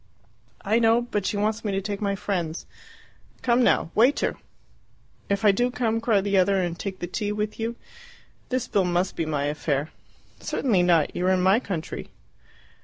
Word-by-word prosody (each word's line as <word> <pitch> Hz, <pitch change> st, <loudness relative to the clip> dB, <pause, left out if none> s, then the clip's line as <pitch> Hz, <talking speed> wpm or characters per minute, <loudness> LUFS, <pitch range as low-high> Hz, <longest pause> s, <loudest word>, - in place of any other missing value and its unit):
"I 220 Hz, +4 st, +3 dB
know. 230 Hz, +1 st, +4 dB
But 210 Hz, -5 st, -2 dB
she 205 Hz, -, -1 dB
wants 215 Hz, +2 st, -1 dB
me 210 Hz, -, -1 dB
to 195 Hz, -, +1 dB
take 200 Hz, +1 st, -4 dB
my 200 Hz, -1 st, 0 dB
friends. 180 Hz, -5 st, -3 dB, 0.8 s
Come 245 Hz, 0 st, +3 dB
now! 165 Hz, -, +2 dB
Waiter!" 245 Hz, +7 st, +3 dB, 0.9 s
"If 200 Hz, +1 st, 0 dB
I 205 Hz, -, +8 dB
do 245 Hz, +5 st, +1 dB
come," 230 Hz, -2 st, -1 dB
cried 215 Hz, -4 st, +2 dB
the 200 Hz, -1 st, +2 dB
other, 195 Hz, +1 st, +3 dB
"and 175 Hz, -2 st, -2 dB
take 195 Hz, -2 st, -5 dB
tea 210 Hz, -2 st, -2 dB
with 210 Hz, +1 st, -3 dB
you, 230 Hz, +1 st, -2 dB, 0.7 s
this 255 Hz, -1 st, -1 dB
bill 195 Hz, -2 st, +1 dB
must 180 Hz, +1 st, 0 dB
be 165 Hz, -, -2 dB
my 150 Hz, -2 st, -1 dB
affair." 145 Hz, 0 st, -1 dB, 0.5 s
"Certainly 215 Hz, -9 st, +1 dB
not; 170 Hz, -3 st, +2 dB
you 180 Hz, -, 0 dB
are -, -, +4 dB
in 185 Hz, -1 st, +1 dB
my 190 Hz, +4 st, +5 dB
country!" 180 Hz, -9 st, -5 dB
200 Hz, 180 wpm, -25 LUFS, 180-225 Hz, 0.9 s, I